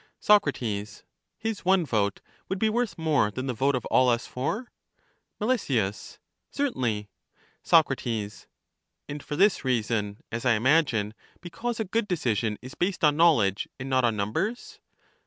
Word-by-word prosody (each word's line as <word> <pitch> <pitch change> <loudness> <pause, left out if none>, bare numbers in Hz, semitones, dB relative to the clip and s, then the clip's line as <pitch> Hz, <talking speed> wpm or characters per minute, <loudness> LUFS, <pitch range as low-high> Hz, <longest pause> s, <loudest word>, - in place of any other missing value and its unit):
Soc, 210 -7 +5
His 105 -2 -5 0.6
one 185 -2 +3
vote 105 -6 0 0.3
would 190 - -1
be 220 +3 +1
worth 240 -1 -1
more 155 -9 +2
than 130 +5 -5
the 130 - -2
vote 135 +4 +1
of 125 - -3
all 130 -1 +5
us 120 0 +1
four? 205 - -4 0.7
Mel, 235 +4 +2
Certainly. 115 - -3 0.5
Soc, 165 -2 +5 1.2
And 145 +1 -6
for 150 - -5
this 200 +6 +3
reason, 110 -5 -1
as 115 0 -3
I 125 -2 +4
imagine, 115 -3 +2
— - - -32
because 225 +7 -4
a 220 - -1
good 215 +3 -1
decision 115 - -1
is 130 - -9
based 180 -1 -2
on 150 -1 +5
knowledge 130 - +3
and 135 +1 -5
not 130 -1 +3
on 115 -2 +2
numbers? 160 - -3
135 Hz, 150 wpm, -27 LUFS, 110-185 Hz, 1.2 s, Soc